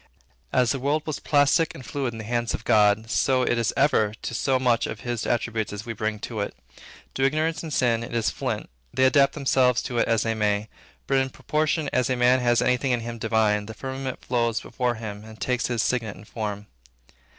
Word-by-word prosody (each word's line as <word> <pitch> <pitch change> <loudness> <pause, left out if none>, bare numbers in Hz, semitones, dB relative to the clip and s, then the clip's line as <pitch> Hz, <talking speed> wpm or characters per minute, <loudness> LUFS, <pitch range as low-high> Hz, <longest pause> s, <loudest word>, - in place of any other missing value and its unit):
As 125 -2 +3
the 135 - -1
world 145 +4 0
was 155 -3 -3
plastic 145 +3 +3
and 130 - -10
fluid 135 -4 -2
in 115 - -9
the 110 - -6
hands 120 +1 -1
of - - -8
God, 105 -1 +3
so 130 -2 +2
it 120 -1 +1
is 115 - +1
ever 110 -7 +3
to - - -4
so 130 +3 +1
much 125 -2 +2
of 110 - -6
his 120 -2 -3
attributes 115 -2 -1
as 105 +1 -6
we 115 - -4
bring 110 0 -2
to 115 -2 -5
it. 100 - -3 0.6
To 135 - -1
ignorance 155 +4 +1
and 160 - -6
sin, 120 -4 +2
it 115 - -6
is 115 -2 +1
flint. - - -3 0.2
They 130 - +1
adapt 140 +1 +5
themselves 130 -4 +2
to 120 -2 -2
it - - +2
as 115 -1 +2
they 115 - 0
may; 105 -1 0 0.4
but 135 - +1
in 130 0 0
proportion 155 +3 -1
as 125 0 +2
a 130 - +2
man 125 +1 +4
has 120 -1 +2
any 125 0 +3
thing 130 0 0
in 120 - 0
him 115 0 -6
divine, 110 -2 +1
the 110 - -8
firmament 130 +1 -5
flows 115 -2 +1
before 125 -2 -2
him 105 -2 -7
and 110 0 -12
takes 125 -1 0
his 120 -3 0
signet 115 -5 -1
and 105 +3 -14
form. 105 -2 -4
120 Hz, 225 wpm, -25 LUFS, 110-130 Hz, 0.6 s, adapt